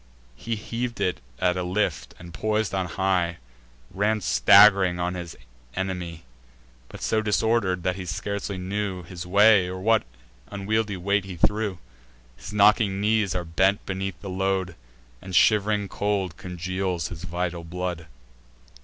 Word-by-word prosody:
He 115 - -4
heav'd 120 +3 -4
it 90 -7 0 0.2
at 90 -1 +1
a - - -1
lift, 95 +4 -2
and, 85 -1 -12
pois'd 110 +2 -1
on 95 -2 -1
high, 90 -1 0 0.5
Ran 105 +2 +1
stagg'ring 100 -2 +6
on 90 +1 -1
against 85 -2 -7
his - - -22 0.3
enemy, 90 -3 -4 0.7
But - - -10
so 110 - +1
disorder'd, 105 -4 +1
that 90 +1 -1
he 95 -2 -6
scarcely 100 +3 -3
knew 95 0 -3
His 90 0 -8
way, 100 0 +5
or 95 +1 -5
what 110 +3 +3 0.5
unwieldly 105 0 -1
weight 100 +2 0
he 95 -2 -7
threw. 105 +1 0 0.6
His 95 +11 -9
knocking 105 -1 +4
knees 105 -2 +1
are 90 -1 -2
bent 95 +4 +1
beneath 95 0 -4
the 100 - -7
load, 95 -1 -1 0.5
And 95 -1 -6
shiv'ring 105 0 +3
cold 100 -4 -2
congeals 90 0 -3
his 85 -1 -8
vital 85 0 -3
blood. 90 -1 -5
95 Hz, 145 wpm, -25 LUFS, 90-105 Hz, 0.7 s, stagg'ring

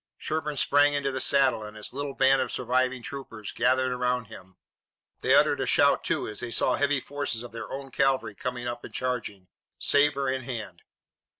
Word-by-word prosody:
Sherburne 150 -2 -3
sprang 145 +1 +4
into 140 -1 0
the 130 -1 -3
saddle 135 -5 +3
and 105 0 -9
his 105 - -3
little 140 0 -4
band 135 0 +4
of - - -2
surviving 125 0 0
troopers 115 -7 -7
gathered 130 +1 +2
around 125 -1 0
him. 95 -4 -13 0.6
They - - +3
uttered - - +4
a - - -1
shout, - - +4
too, - - -1
as 105 - -6
they 120 - -4
saw - - +2
heavy 145 -1 +1
forces 140 -4 -3
of 120 - -9
their 115 0 -7
own 135 0 -6
cavalry 135 +1 +1
coming 125 -2 -4
up 120 0 -5
and - - -9
charging, 115 -7 -3 0.3
sabre 145 -1 +2
in 130 0 -1
hand. 110 -9 -7
130 Hz, 190 wpm, -27 LUFS, 120-140 Hz, 0.6 s, sprang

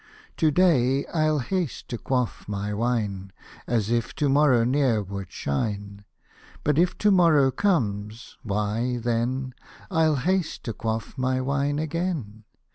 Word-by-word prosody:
To 160 - +3
day 140 -5 +3
I'll 155 -2 +2
haste 160 +4 -2
to 120 - -4
quaif 125 -3 -2
my 105 0 -3
wine, 105 -4 -1 0.4
As 115 -2 0
if 120 -1 -1
to 145 -2 +1
morrow 135 -4 +4
ne'er 125 -4 +2
would 100 -1 -7
shine; 100 +7 -3 0.6
But 150 +1 +2
if 180 +1 +2
to 210 - +3
morrow 160 -8 +5
comes, 115 - -1
why 110 +4 -1
then 120 +3 -1 0.2
— - - -21
ril 160 -3 +3
haste 180 +5 -1
to 115 - -4
quaff 110 0 -4
my 130 0 +1
wine 140 +2 0
again. 155 - -3
125 Hz, 140 wpm, -25 LUFS, 110-150 Hz, 0.6 s, morrow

